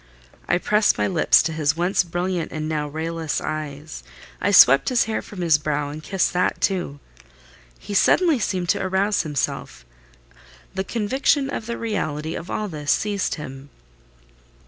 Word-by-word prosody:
I 175 - +3
pressed 210 +3 +2
my - - +1
lips 175 -4 +4
to 165 - -2
his 155 -1 0
once 180 +2 +2
brilliant 175 0 -3
and 155 0 -4
now 150 -1 -2
rayless 160 +1 -3
eyes—I 145 - -6
swept 135 +2 +7
his 250 -2 +3
hair 220 0 -2
from 195 -3 -9
his 160 -3 +3
brow, 150 -1 -2
and 155 +1 -8
kissed 190 +2 0
that 180 0 0
too. 175 -7 -1 0.8
He 205 - -8
suddenly 320 - +4
seemed 185 -4 -2
to - - +2
arouse 190 +2 +1
himself: 145 - -4 0.9
the 190 - -2
conviction 265 +6 0
of 225 - -5
the 235 - -3
reality 160 -9 -3
of 175 - -7
all 215 - -2
this 150 -5 -2
seized 205 -2 0
him. 135 -2 -9
170 Hz, 155 wpm, -22 LUFS, 150-200 Hz, 0.9 s, swept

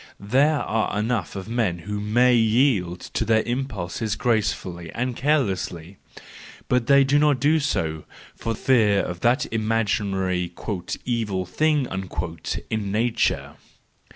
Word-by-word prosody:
There 135 +9 +2
are 110 -2 -1
enough 110 -4 -1
of 95 0 -6
men 115 -7 0
who 105 +5 -5
may 120 +5 +3
yield 110 -6 +2
to - - -3
their 110 0 +2
impulses 110 -4 -3
gracefully 95 -7 -1
and 125 0 -2
carelessly: 95 - -1 0.7
but 125 -1 +1
they 140 -1 +6
do 140 +2 +3
not 145 -3 +3
do 150 +4 +3
so, 80 - -2 0.3
for 115 0 -3
fear 105 -5 +3
of 90 -1 -5
that 120 +7 +2
imaginary 100 -5 0 0.3
" 90 - -7
evil 110 -6 -1
thing 150 - +1 0.4
" 80 -1 -6
in 105 -3 -2
nature! 115 +2 0
110 Hz, 130 wpm, -23 LUFS, 95-125 Hz, 0.7 s, they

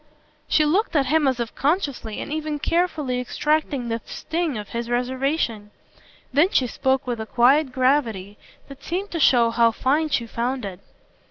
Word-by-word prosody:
She 305 - +3
looked 350 +4 +1
at 280 -2 +3
him 300 +2 +2
as 260 -2 0
if 235 -1 -3
consciously 280 - -1
and - - -5
even 310 -1 -3
carefully 300 -5 0
extracting 285 0 -1
the 230 0 -2
sting 325 -6 -3
of 210 -1 -7
his 235 0 -4
reservation; 250 -3 -1 0.6
then 305 +6 +4
she 260 - +2
spoke 265 +2 0
with 240 -3 -3
a 220 - -6
quiet 265 +5 +3
gravity 245 -7 0 0.3
that 275 0 -13
seemed 385 +4 -3
to 335 - -3
show 240 -5 +4
how 230 0 +4
fine 295 +7 0
she 240 -5 0
found 240 +1 -3
it. 185 -2 -7
265 Hz, 170 wpm, -23 LUFS, 235-305 Hz, 0.6 s, then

